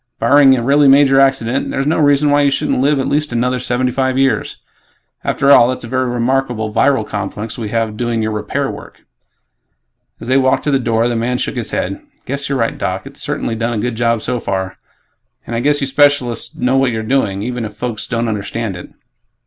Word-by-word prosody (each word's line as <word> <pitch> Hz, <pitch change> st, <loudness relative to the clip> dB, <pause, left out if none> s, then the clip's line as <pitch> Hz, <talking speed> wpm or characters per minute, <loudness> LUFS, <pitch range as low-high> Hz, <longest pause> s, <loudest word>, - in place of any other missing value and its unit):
Barring 140 Hz, -2 st, +5 dB
a 120 Hz, -, -2 dB
really 140 Hz, +3 st, +4 dB
major 135 Hz, 0 st, +5 dB
accident, 135 Hz, -2 st, +1 dB
there's 135 Hz, -, -2 dB
no 155 Hz, +3 st, +1 dB
reason 145 Hz, 0 st, +3 dB
why 145 Hz, 0 st, +4 dB
you 140 Hz, -, +3 dB
shouldn't 135 Hz, -, 0 dB
live 145 Hz, +2 st, +2 dB
at 135 Hz, -, -1 dB
least 150 Hz, 0 st, 0 dB
another 125 Hz, +2 st, 0 dB
seventy 125 Hz, +1 st, -1 dB
five 130 Hz, 0 st, -1 dB
years. 135 Hz, 0 st, 0 dB, 0.7 s
After 140 Hz, 0 st, +2 dB
all, 120 Hz, -, +7 dB
that's 130 Hz, 0 st, -3 dB
a -, -, -7 dB
very 130 Hz, +1 st, -1 dB
remarkable 120 Hz, -2 st, -1 dB
viral 135 Hz, -4 st, +2 dB
complex 105 Hz, +2 st, -5 dB
we 110 Hz, -3 st, -5 dB
have 115 Hz, -1 st, -2 dB
doing 120 Hz, -1 st, -1 dB
your 110 Hz, -, -1 dB
'repair' 105 Hz, 0 st, -2 dB
work." -, -, -12 dB, 1.1 s
As 115 Hz, -, -9 dB
they 130 Hz, +1 st, +3 dB
walked 130 Hz, 0 st, +2 dB
to 145 Hz, -, 0 dB
the 135 Hz, -, +2 dB
door, 115 Hz, -1 st, +1 dB
the 120 Hz, -, -1 dB
man 120 Hz, +2 st, -1 dB
shook -, -, -2 dB
his 120 Hz, -3 st, -4 dB
head, 300 Hz, -, -3 dB, 0.2 s
"Guess 140 Hz, 0 st, -3 dB
you're 140 Hz, -, 0 dB
right, 115 Hz, -2 st, -1 dB
Doc. -, -, -3 dB
It's -, -, -9 dB
certainly 115 Hz, -, -3 dB
done 115 Hz, +1 st, -2 dB
a -, -, -2 dB
good 125 Hz, -1 st, -1 dB
job 115 Hz, -1 st, 0 dB
so 125 Hz, 0 st, -2 dB
far, 95 Hz, -3 st, -4 dB, 0.7 s
and 120 Hz, -, -5 dB
I -, -, 0 dB
guess 145 Hz, +3 st, +1 dB
you -, -, +1 dB
specialists 130 Hz, -4 st, +1 dB
know 130 Hz, +2 st, +1 dB
what 135 Hz, -1 st, +2 dB
you're 110 Hz, -2 st, -3 dB
doing, 110 Hz, -5 st, 0 dB
even 120 Hz, 0 st, -3 dB
if 105 Hz, -1 st, -7 dB
folks 120 Hz, -2 st, -4 dB
don't 115 Hz, -1 st, -1 dB
understand 105 Hz, -1 st, -3 dB
it." 90 Hz, -, -9 dB
125 Hz, 215 wpm, -16 LUFS, 115-135 Hz, 1.1 s, all